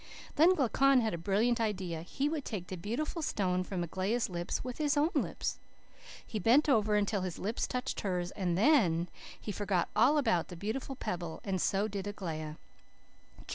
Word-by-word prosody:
Then 340 Hz, +5 st, +6 dB
Glaucon 270 Hz, -1 st, +4 dB
had 220 Hz, -2 st, 0 dB
a -, -, -2 dB
brilliant 220 Hz, +7 st, +1 dB
idea. 185 Hz, -7 st, -2 dB
He 270 Hz, -, -2 dB
would 300 Hz, -2 st, -2 dB
take 200 Hz, -8 st, -4 dB
the 185 Hz, -, -6 dB
beautiful 240 Hz, -, -3 dB
stone 185 Hz, -9 st, 0 dB
from 180 Hz, -1 st, -3 dB
Aglaia's 195 Hz, +7 st, -1 dB
lips 175 Hz, 0 st, -3 dB
with 250 Hz, +2 st, -6 dB
his 295 Hz, -1 st, +1 dB
own 305 Hz, +4 st, +3 dB
lips. -, -, -1 dB, 0.7 s
"He 215 Hz, -, -4 dB
bent 250 Hz, -, +4 dB
over 215 Hz, -6 st, +3 dB
until 205 Hz, -1 st, +1 dB
his 180 Hz, -3 st, -4 dB
lips 215 Hz, +4 st, -2 dB
touched 250 Hz, 0 st, -3 dB
hers 180 Hz, -2 st, -2 dB
and 180 Hz, -4 st, -1 dB
THEN, 185 Hz, -, +4 dB, 0.3 s
he 210 Hz, -, -5 dB
forgot 195 Hz, -3 st, 0 dB
all 245 Hz, +8 st, +5 dB
about 220 Hz, -, +2 dB
the 180 Hz, -, -8 dB
beautiful 220 Hz, +9 st, -4 dB
pebble 175 Hz, -8 st, -4 dB
and 190 Hz, -3 st, -1 dB
so 200 Hz, +2 st, +1 dB
did 200 Hz, -1 st, -4 dB
Aglaia. 160 Hz, -6 st, -5 dB
205 Hz, 175 wpm, -32 LUFS, 180-250 Hz, 0.7 s, Then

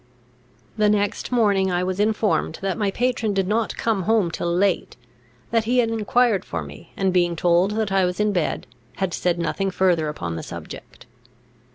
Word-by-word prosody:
The 210 Hz, -1 st, +3 dB
next 205 Hz, +2 st, 0 dB
morning 200 Hz, -6 st, +2 dB
I 175 Hz, 0 st, 0 dB
was 185 Hz, +1 st, -2 dB
informed 215 Hz, 0 st, +1 dB
that 195 Hz, -1 st, 0 dB
my 205 Hz, -3 st, 0 dB
patron 235 Hz, -1 st, -1 dB
did 195 Hz, -1 st, +1 dB
not 220 Hz, +2 st, -1 dB
come 220 Hz, -4 st, 0 dB
home 215 Hz, -7 st, +3 dB
till 170 Hz, +1 st, -2 dB
late; 185 Hz, +2 st, 0 dB, 0.5 s
that 225 Hz, -1 st, +2 dB
he 245 Hz, +3 st, +1 dB
had 230 Hz, -2 st, +3 dB
enquired 225 Hz, -1 st, +2 dB
for 85 Hz, -2 st, -4 dB
me, 75 Hz, -1 st, -12 dB
and, 190 Hz, -2 st, +1 dB
being 175 Hz, -1 st, +2 dB
told 175 Hz, +4 st, +2 dB
that 215 Hz, -3 st, -1 dB
I 195 Hz, -1 st, +3 dB
was 180 Hz, +1 st, -3 dB
in 210 Hz, 0 st, +2 dB
bed, 175 Hz, -5 st, -1 dB, 0.3 s
had 190 Hz, -3 st, -2 dB
said 175 Hz, -1 st, 0 dB
nothing 185 Hz, +4 st, -1 dB
further 175 Hz, -5 st, +1 dB
upon 85 Hz, -, -4 dB
the -, -, -4 dB
subject. -, -, -10 dB
195 Hz, 185 wpm, -23 LUFS, 175-215 Hz, 0.5 s, The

